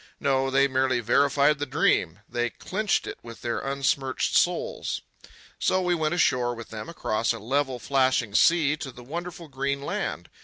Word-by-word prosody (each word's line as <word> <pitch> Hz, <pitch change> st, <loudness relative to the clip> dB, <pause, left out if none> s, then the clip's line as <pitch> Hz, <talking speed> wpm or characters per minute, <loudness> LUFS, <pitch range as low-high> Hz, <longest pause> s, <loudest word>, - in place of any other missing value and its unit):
No, 135 Hz, -1 st, +1 dB
they 135 Hz, +1 st, +4 dB
merely 130 Hz, -1 st, +1 dB
verified 140 Hz, +4 st, +3 dB
the 145 Hz, -, -2 dB
dream. -, -, +1 dB
They 120 Hz, 0 st, -1 dB
clinched 210 Hz, -, -1 dB
it -, -, -7 dB
with 115 Hz, -1 st, -11 dB
their 120 Hz, -1 st, -1 dB
unsmirched 135 Hz, -1 st, -1 dB
souls. -, -, 0 dB, 0.6 s
So 185 Hz, -, +2 dB
we 180 Hz, 0 st, +2 dB
went 160 Hz, 0 st, 0 dB
ashore 125 Hz, -7 st, +2 dB
with 115 Hz, 0 st, -9 dB
them 110 Hz, +8 st, -7 dB
across 115 Hz, -9 st, -1 dB
a -, -, -6 dB
level 130 Hz, +4 st, -1 dB
flashing 130 Hz, -4 st, +1 dB
sea 150 Hz, +5 st, +4 dB
to 145 Hz, -4 st, -6 dB
the 125 Hz, 0 st, -13 dB
wonderful 170 Hz, +4 st, -6 dB
green 140 Hz, 0 st, -2 dB
land. 85 Hz, -, -3 dB
135 Hz, 165 wpm, -26 LUFS, 120-145 Hz, 0.6 s, they